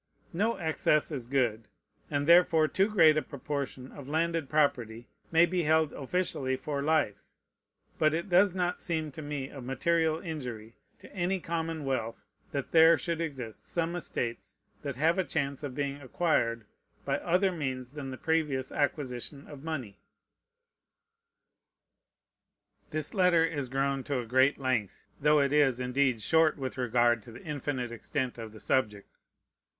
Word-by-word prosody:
No 215 +7 +1
excess 160 -2 +1
is 130 -6 -4
good, 120 -5 0 0.4
and 145 -1 -1
therefore 170 -1 +6
too 195 +6 +1
great 160 -7 +5
a - - +3
proportion 140 -3 -5
of 140 -2 -10
landed 165 -1 0
property 120 -6 0 0.2
may 165 +1 +6
be 180 +1 -1
held 160 -1 +2
officially 140 -3 -1
for 140 +1 -3
life; 150 -8 0 0.7
but 155 0 +4
it 170 +4 -2
does 185 +1 +4
not 180 -1 -1
seem 160 -3 -2
to 155 - -8
me 145 -2 -4
of 135 -3 -9
material 160 +5 +1
injury 125 - -6 0.3
to - - -14
any 185 +1 0
common 165 -2 -3
wealth 115 -4 -3 0.3
that 140 -4 -4
there 165 0 +7
should 170 -1 -2
exist 130 -9 -5
some 170 0 -2
estates 115 - -4 0.3
that 140 -3 -4
have 160 +7 +2
a - - +3
chance 140 -5 -2
of 140 -4 -5
being 140 0 -3
acquired 120 -6 0 0.4
by - - 0
other 185 +3 +2
means 130 -7 -4
than 145 -2 -6
the 130 - -6
previous 150 -5 0
acquisition 140 -1 -2
of 145 -2 -11
money. 135 -11 -5 2.9
This 155 -1 -2
letter 180 -4 +4
is 145 -6 -3
grown 135 0 0
to 140 - -1
a 125 - -3
great 130 +4 +3
length, 130 -7 -2 0.2
though 150 +1 +5
it 140 0 +2
is, 140 -4 +3
indeed, 125 -2 +1
short 160 +2 +3
with 130 -2 -4
regard 120 -2 +2
to 115 - -13
the 115 - -12
infinite 140 -5 -3
extent 125 +1 -3
of 110 -1 -7
the 110 - -12
subject. 105 -6 -1
145 Hz, 155 wpm, -29 LUFS, 130-160 Hz, 2.9 s, there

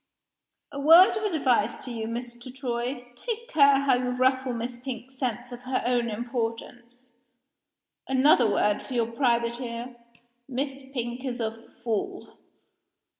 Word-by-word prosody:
"A 280 - -6
word 330 +6 +7
of 420 -1 -1
advice 250 -8 +2
to 255 - -5
you, 225 -2 -4
Mr. 240 +1 -6
Troy. 245 -1 -4
Take 465 - -5
care 280 - +5
how 275 -1 +3
you 250 0 -1
ruffle 260 +1 +1
Miss 240 +1 -4
Pink's 255 0 -8
sense 245 -1 -3
of 245 - -7
her 255 +1 -2
own 240 -1 +1
importance. 240 +2 -5 1.0
Another 265 -3 +5
word 205 0 +1
for 260 - -7
your 230 -1 0
private 235 -1 +1
ear. 240 0 -6 0.5
Miss 275 +1 -3
Pink 240 -1 -4
is 250 -2 -4
a 225 0 -5
fool." 220 -4 -3
245 Hz, 140 wpm, -26 LUFS, 235-265 Hz, 1.0 s, word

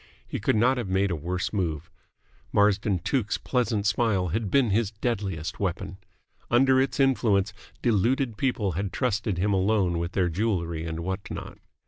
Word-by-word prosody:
He - - -4
could - - +1
not 125 +4 +3
have 110 -6 -4
made 95 +1 +1
a - - 0
worse 90 +6 -3
move. 85 -4 -2 0.6
Marsden 100 -1 +3
Tuke's 110 0 0
pleasant 120 -5 -1
smile 100 -3 +1
had 105 +4 -1
been 130 -3 +3
his 110 0 +2
deadliest 100 -7 -3
weapon. 95 0 -3 0.5
Under 130 +2 +4
its 130 -1 -1
influence 110 -7 +2 0.3
deluded 120 +2 +2
people 110 -5 0
had 95 +3 -3
trusted 110 -5 -1
him 100 +3 +1
alone 95 -3 +2
with 85 +1 -3
their 90 -2 +2
jewellery 85 -4 -1
and 80 0 -4
what 95 +3 -4
not. - - -7
100 Hz, 160 wpm, -26 LUFS, 90-115 Hz, 0.6 s, Under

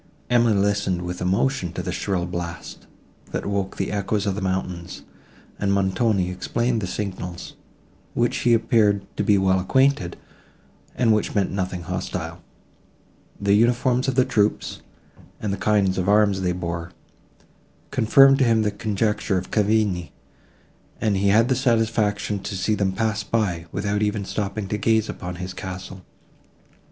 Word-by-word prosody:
Emily 120 -3 +4
listened 100 -3 +1
with 90 0 -5
emotion 95 0 0
to 90 - -4
the 90 - -3
shrill 90 0 -1
blast, 85 -1 -6 0.4
that - - -4
woke 100 -1 -2
the 95 - -2
echoes 100 0 -1
of 100 - 0
the 105 - -4
mountains, 90 -2 -3 0.6
and 100 -1 +1
Montoni 95 0 +1
explained 115 +5 -1
the 95 - -3
signals, 90 -3 -5 0.6
with - - 0
which 120 - 0
he 120 -1 +4
appeared 110 -4 +2
to - - -1
be 105 - +4
well 95 -1 +3
acquainted, 130 -2 +2 0.8
and 115 -3 +3
which 105 - -1
meant 100 -2 +1
nothing 95 -2 -3
hostile. 90 -2 -4 1.0
The 100 0 +2
uniforms 120 +4 +2
of 135 - 0
the 130 -1 +4
troops, 110 -4 0 0.6
and 105 -2 -2
the - - -3
kind 100 -3 +2
of 95 +1 -1
arms 100 -2 +3
they 90 -1 +1
bore, 85 0 -4 1.0
confirmed 135 +5 +6
to - - +4
him 115 -3 +3
the 105 - +1
conjecture 105 -1 -1
of 90 - -5
Cavigni, 105 -5 +1 0.9
and 105 -3 +1
he 100 +1 +1
had 110 +4 +5
the 130 - +2
satisfaction 110 -5 +1
to 95 0 -5
see 95 +4 0
them 100 -2 +1
pass 110 +2 -1
by, 90 -7 -1
without 105 +1 -1
even 105 -1 0
stopping 100 0 -3
to 105 - -2
gaze 110 0 +2
upon 90 0 -5
his 90 +1 -6
castle. 95 0 -7
100 Hz, 155 wpm, -23 LUFS, 95-110 Hz, 1.0 s, confirmed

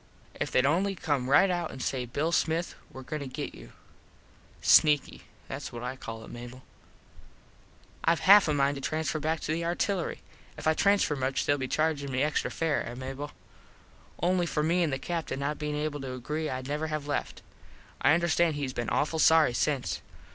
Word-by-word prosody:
If - - -3
theyd 130 - +3
only 190 +7 +2
come 140 -7 -1
right 145 +8 +6
out 175 -2 -1
an 130 - -9
say 125 0 -2
Bill 150 +7 -1
Smith 165 +1 0 0.2
were 130 - -9
goin 155 +4 -4
to 140 - -5
get 130 - -5
you. - - -12 0.9
Sneaky. 150 -2 +4 0.2
Thats - - -6
what 120 0 -7
I 125 +1 -3
call 115 -3 -8
it, - - -12
Mable. 120 +2 -9 1.4
Ive 165 -1 +3
half 200 0 +8
a 150 - +1
mind 140 0 +2
to - - -6
transfer 155 +2 -1
back 160 +2 -1
to - - -3
the 165 +2 -1
artillery. 175 +2 -1 0.4
If - - -8
I 160 - +4
transfer 200 -3 +3
much 135 0 -1
more - - -6
theyll - - -6
be 130 - -2
chargin 155 -1 0
me 130 +1 +1
extra 150 0 0
fare, 160 -3 0
eh 120 - -7
Mable? 135 +3 -6 0.9
Only 175 +1 +1
for 150 -2 -1
me 170 +3 +2
an 165 - +2
the 135 - -1
Captin 165 -3 -3
not 145 +2 -2
bein 150 -1 -2
able 150 0 -2
to 130 -1 -5
agree 150 +5 -3
Id 130 0 -4
never 150 +2 -2
have 155 -2 -3
left. 145 0 -3 0.6
I 145 +4 +5
understand 170 -1 +2
hes 140 -3 -3
been 120 -2 -3
awful 160 +2 0
sorry 160 -5 +5
since. 130 - -1
150 Hz, 200 wpm, -29 LUFS, 135-160 Hz, 1.4 s, half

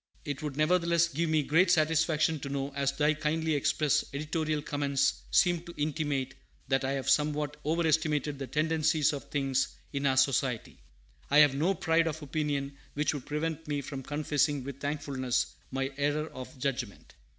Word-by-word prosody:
It 145 0 -4
would, 145 -3 -4
nevertheless, 170 +1 +3
give 165 +2 -1
me 155 -1 +2
great 165 +6 +3
satisfaction 160 -1 +2
to 140 - -6
know, 140 0 -3
as 140 -1 0
thy 150 +2 +2
kindly 155 +1 -1
expressed 145 0 +1
editorial 155 0 -1
comments 140 -2 0
seem 175 -2 +3
to 170 - -10
intimate, 145 -3 -1 0.4
that 135 0 +2
I 135 +1 0
have 135 -1 -3
somewhat 150 +1 +1
overestimated 155 -2 +1
the 135 - -4
tendencies 155 +2 +2
of 140 - -5
things 135 -2 0 0.2
in 140 0 0
our 130 -1 +2
Society. 130 -3 +1 0.5
I 145 - +4
have 150 -2 +7
no 165 +8 +1
pride 165 0 +2
of 160 -1 -4
opinion 145 -2 -2 0.2
which 150 +2 +1
would 140 -4 -7
prevent 160 +1 -3
me 145 -1 -1
from 135 0 -6
confessing 145 0 0
with 140 0 -7
thankfulness 135 -4 -1 0.2
my 135 +1 -2
error 145 +2 0
of 130 +3 -9
judgment. 125 -5 -4
150 Hz, 165 wpm, -30 LUFS, 140-155 Hz, 0.5 s, have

